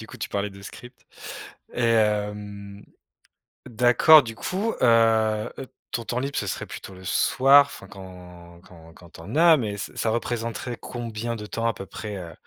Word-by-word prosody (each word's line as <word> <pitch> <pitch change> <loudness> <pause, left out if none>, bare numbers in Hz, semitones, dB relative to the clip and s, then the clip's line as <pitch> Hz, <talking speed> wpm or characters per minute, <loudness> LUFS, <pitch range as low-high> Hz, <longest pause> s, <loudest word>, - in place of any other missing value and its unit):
du 110 - -9
coup, - - -12
tu - - -4
parlais 100 0 -2
de 100 0 -13
script 125 +5 -12 0.7
et 120 - -2
hem, 105 -2 -1 0.8
d'accord, 125 +6 +6
du 115 -2 -7
coup, 200 - -2
heu 110 -2 +3
heu, 135 - -7 0.2
ton 120 - -3
temps 120 - -2
libre, 140 +2 -4
ce - - -1
serait - - -4
plutôt 95 - -9
le 95 0 -13
soir. 135 +7 +5
Enfin, 95 -8 -12
quand 90 -3 -13
quand 80 -3 -16
quand 85 0 -16
tu - - -13
en 85 - -8
as. 165 0 +6
Mais, 105 -6 -3
ce 100 - -7
ça 115 - -1
représenterait 115 +1 -3
combien 115 -1 -5
de 105 -2 -7
temps 115 +2 -2
à 115 - +1
peu 95 - -8
près, 105 -2 -7
heu, 85 -3 -8
110 Hz, 190 wpm, -24 LUFS, 100-120 Hz, 0.8 s, d'accord